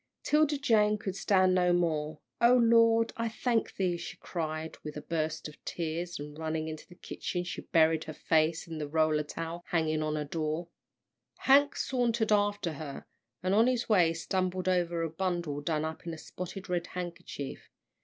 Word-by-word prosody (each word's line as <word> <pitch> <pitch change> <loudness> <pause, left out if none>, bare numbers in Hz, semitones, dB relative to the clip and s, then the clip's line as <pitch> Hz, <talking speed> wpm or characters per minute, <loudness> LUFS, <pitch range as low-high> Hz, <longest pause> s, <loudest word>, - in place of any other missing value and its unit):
'Tilda 300 -1 +3
Jane 215 -6 +3
could 195 -3 -4
stand 190 -1 +3
no 180 -1 +3
more. 155 -3 0 0.2
"O 240 +1 +7
Lord, 230 -1 +5
I 230 0 -1
thank 230 +1 0
thee!" 180 -3 0
she 170 - -7
cried, 160 -2 -4
with 150 0 -6
a - - -5
burst 160 -1 -2
of 150 - -14
tears, 170 +1 -3
and 145 0 -8
running 160 0 -2
into 155 -1 -7
the 175 - -14
kitchen, 175 0 -4
she 180 - -5
buried 160 -1 +3
her 155 - -6
face 160 +2 +1
in 160 -1 -6
the 150 - -3
roller 155 0 +2
towel 165 +3 -5
hanging 155 -2 +1
on 155 0 -1
a 150 - -2
door. 155 +2 -3 0.7
Hank 285 +1 +5
sauntered 235 -4 0
after 205 -5 +2
her, 145 -2 -7 0.4
and 185 +1 +1
on 225 +4 +5
his 250 -2 0
way 180 -6 +5
stumbled 185 +2 -2
over 175 -2 +1
a - - 0
bundle 170 -4 -2
done 155 +1 -1
up 160 +2 -6
in 165 - -3
a - - -11
spotted 185 +4 -7
red 180 -1 -1
handkerchief. 170 -5 -6
170 Hz, 180 wpm, -30 LUFS, 155-205 Hz, 0.7 s, O